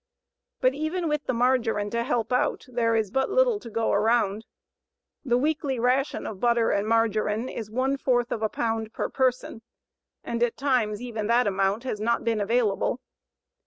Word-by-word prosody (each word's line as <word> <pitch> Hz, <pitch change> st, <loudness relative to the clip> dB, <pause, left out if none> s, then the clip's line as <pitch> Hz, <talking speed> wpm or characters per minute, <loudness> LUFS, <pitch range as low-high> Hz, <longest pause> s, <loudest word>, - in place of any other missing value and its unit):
But 255 Hz, 0 st, +3 dB
even 315 Hz, +4 st, -2 dB
with 300 Hz, -1 st, -1 dB
the -, -, +1 dB
margarine 230 Hz, -4 st, +1 dB
to 235 Hz, -, 0 dB
help 235 Hz, 0 st, -1 dB
out, 250 Hz, -, 0 dB
there 235 Hz, -2 st, 0 dB
is 215 Hz, -3 st, 0 dB
but 265 Hz, +2 st, 0 dB
little -, -, +3 dB
to 235 Hz, -, -10 dB
go 225 Hz, +1 st, 0 dB
around. 215 Hz, 0 st, +1 dB, 0.8 s
The 245 Hz, -4 st, +2 dB
weekly 290 Hz, -1 st, 0 dB
ration 255 Hz, +4 st, 0 dB
of 200 Hz, -, -6 dB
butter 235 Hz, 0 st, +2 dB
and 200 Hz, +1 st, 0 dB
margarine 220 Hz, 0 st, +1 dB
is 220 Hz, -4 st, -6 dB
one 260 Hz, +4 st, 0 dB
fourth 245 Hz, -3 st, 0 dB
of 220 Hz, -, -2 dB
a 220 Hz, -, +1 dB
pound 225 Hz, 0 st, -2 dB
per -, -, -2 dB
person, 255 Hz, -3 st, -1 dB, 0.6 s
and 235 Hz, 0 st, -3 dB
at 240 Hz, -1 st, +1 dB
times 245 Hz, -6 st, 0 dB
even 225 Hz, -4 st, -4 dB
that 240 Hz, +2 st, +3 dB
amount 195 Hz, +2 st, 0 dB
has 250 Hz, -5 st, -3 dB
not 235 Hz, +2 st, 0 dB
been 225 Hz, -2 st, 0 dB
available. 225 Hz, +1 st, +1 dB
235 Hz, 175 wpm, -26 LUFS, 220-255 Hz, 0.8 s, But